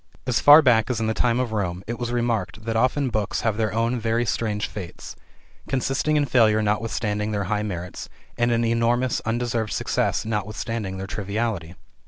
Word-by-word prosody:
As 125 -3 +1
far 150 +2 +8
back 120 -4 +4
as 125 -3 -1
in 110 - 0
the 110 - 0
time 120 +1 +1
of 125 -3 -1
Rome, 95 -4 -2
it 115 0 -5
was 120 -1 -3
remarked 120 -2 -2
that 115 -1 -2
often 130 +4 +2
books 105 -2 -1
have 110 -3 0
their 110 -1 0
own 115 +2 0
very 115 +1 0
strange 105 -2 -1
fates: 90 -6 -8 0.5
consisting 135 +3 0
in 145 - +2
failure 110 -4 +3
notwithstanding 105 0 -1
their 105 -2 -1
high 105 - 0
merits, 90 -4 -5 0.3
and 120 0 +1
in 115 0 +2
enormous 115 +2 +1
undeserved 115 -1 -1
success - - 0
notwithstanding 105 -1 -3
their 95 - -5
triviality. 100 -3 -3
115 Hz, 180 wpm, -24 LUFS, 105-120 Hz, 0.5 s, far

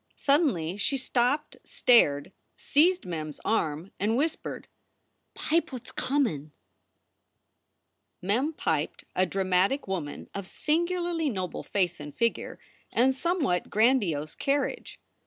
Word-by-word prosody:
Suddenly 235 - +1
she 270 +7 +1
stopped, 255 +3 0
stared, 150 - +3 0.3
seized 355 +5 +3
Mem 155 -3 -4
s 150 - -10
arm, 165 -4 0
and 220 +4 +1
whispered, 310 +4 -2 0.7
"Pipe 330 0 0
what 255 -3 -7
s - - -10
comin 205 - -1 0.9
!" - - -51
Mem 240 - +1
piped 160 - -2
a 185 0 +3
dramatic 190 +7 +1
woman 170 -7 -4
of 200 -2 -5
singularly 340 - 0
noble 185 - -3
face 180 -3 -1
and 150 -1 -8
figure 230 -1 -1 0.3
and 260 +3 +3
somewhat 280 - 0
grandiose 200 - +2
carriage. 280 +1 -2
225 Hz, 120 wpm, -28 LUFS, 175-285 Hz, 0.9 s, stared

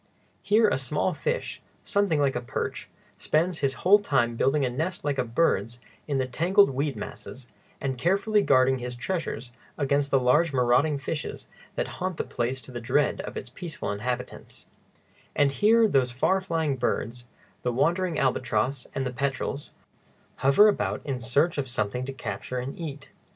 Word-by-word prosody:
Here 215 +2 +4
a 205 - +1
small 150 +7 -1
fish, 485 +1 -3 0.2
something 200 -7 +1
like 140 -2 +2
a 120 - -1
perch, 120 - -4 0.3
spends 165 +2 +1
his 135 -1 0
whole 205 +3 +7
time 130 - +1
building 135 +4 +2
a - - 0
nest 160 +6 -3
like 145 -2 0
a - - +3
bird's 115 -3 0 0.3
in 140 -3 0
the 130 - +1
tangled 175 +8 +3
weed 140 +1 -1
masses, 120 +3 -9 0.3
and 130 -2 -3
carefully 200 - +2
guarding 130 -6 +3
his 125 0 -5
treasures 130 -4 -4 0.3
against 140 0 +1
the 135 - +3
large 145 +6 +3
marauding 130 +4 +3
fishes 150 +2 -5 0.3
that - - -1
haunt 185 -2 -2
the - - -1
place 125 +2 -3
to 130 - -11
the 120 -1 -6
dread 115 - +1
of - - -7
its 120 - -7
peaceful 160 - -5
inhabitants; 125 +5 -5 0.7
and 145 -1 +3
here 220 +8 +4
those 130 -9 +2
far 190 +10 +1
flying 160 -6 -1
birds, 120 0 -2 0.4
the 125 - 0
wandering 170 +6 +1
albatross 130 -1 0
and 135 - -1
the 125 - -3
petrels, 140 +2 -3 0.7
hover 140 +11 +6
about 210 - 0
in 135 -3 -2
search 145 +7 +1
of 135 -2 -2
something 120 +2 -1
to 135 - -4
capture 125 -1 -5
and 125 +2 -4
eat. 145 -5 -7
135 Hz, 170 wpm, -26 LUFS, 125-165 Hz, 0.7 s, whole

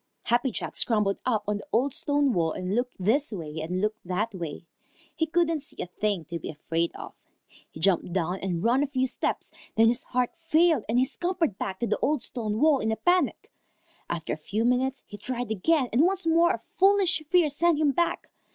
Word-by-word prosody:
Happy 240 +3 +2
Jack - - -5
scrambled 210 -4 +2
up 220 -4 +1
on 210 0 0
the 295 - -12
old 255 +4 +1
stone 290 -4 +1
wall 165 -4 +1
and 185 +1 -3
looked 245 +2 -1
this 240 +11 +1
way 160 -5 -5
and 180 +4 -2
looked 215 +1 -2
that 185 +5 -2
way. 170 -3 -6 0.5
He 320 - 0
couldn't 330 0 +1
see 280 - -11
a - - -2
thing 185 -1 -2
to 170 +3 -5
be - - -7
afraid 165 +2 -2
of. - - -8 0.6
He - - -12
jumped 180 0 +2
down 185 +1 -1
and 175 -3 -2
ran 245 +4 +3
a 290 - +1
few 260 -2 0
steps. 260 - -2 0.2
Then 225 +1 +5
his 240 +1 0
heart 250 -1 0
failed, 325 -5 +3
and 230 - +2
he 255 - +4
scampered 345 - -2
back 190 -1 -4
to - - +2
the - - -1
old 295 -3 0
stone 220 -3 -3
wall 300 -1 +4
in 220 - 0
a - - +1
panic. 355 +11 +1 0.6
After 165 -2 -3
a - - -4
few 210 +9 -2
minutes 260 +2 +1
he 205 - -10
tried 245 +1 -4
again, 260 - +2
and 245 - +4
once 380 -1 -1
more 335 +1 +4
a - - -2 0.2
foolish 385 -3 +4
fear 350 -4 +4
sent 335 +2 +2
him 300 -2 +3
back. 345 +4 -1
240 Hz, 215 wpm, -27 LUFS, 195-300 Hz, 0.6 s, Then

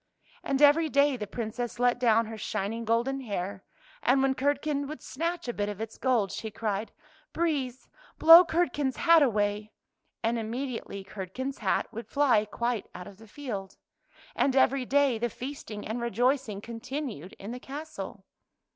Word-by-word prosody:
And 275 +1 +1
every 310 +2 +6
day 280 0 +3
the 210 -4 -5
Princess 235 +1 -4
let 245 0 +2
down 230 -2 +4
her 220 +1 -7
shining 215 +3 -3
golden 235 +5 +1
hair, 195 -5 -4 0.4
and 265 +1 +3
when 270 0 +3
Curdken 285 +1 0
would 305 +2 -8
snatch 335 +2 -3
a 240 - -2
bit 205 -1 -2
of 205 -1 -6
its 225 0 -6
gold, 235 -7 +1
she 220 - -5
cried, 210 -1 -3 0.2
" 315 - -32
Breeze, 280 -7 -1 0.3
blow 330 +2 +10
Curdken's 320 -5 0
hat 335 -1 +6
away! 210 -4 +1 0.2
" - - -50
And 230 +1 +1
immediately 225 -3 -4
Curdken's 215 +8 -6
hat 195 -3 +1
would 230 +1 -6
fly 270 -7 +3
quite 235 +1 -2
out 180 - -7
of 195 - -12
the 225 +1 -15
field. 205 -7 -6 0.6
And 270 - +2
every 265 -1 +3
day 275 -3 +2
the 240 +1 0
feasting 250 -4 -7
and 225 +3 -3
rejoicing 235 -1 0
continued 235 - -6
in 200 +3 -8
the 250 - -6
castle. 265 -9 -8
240 Hz, 165 wpm, -28 LUFS, 215-275 Hz, 0.6 s, blow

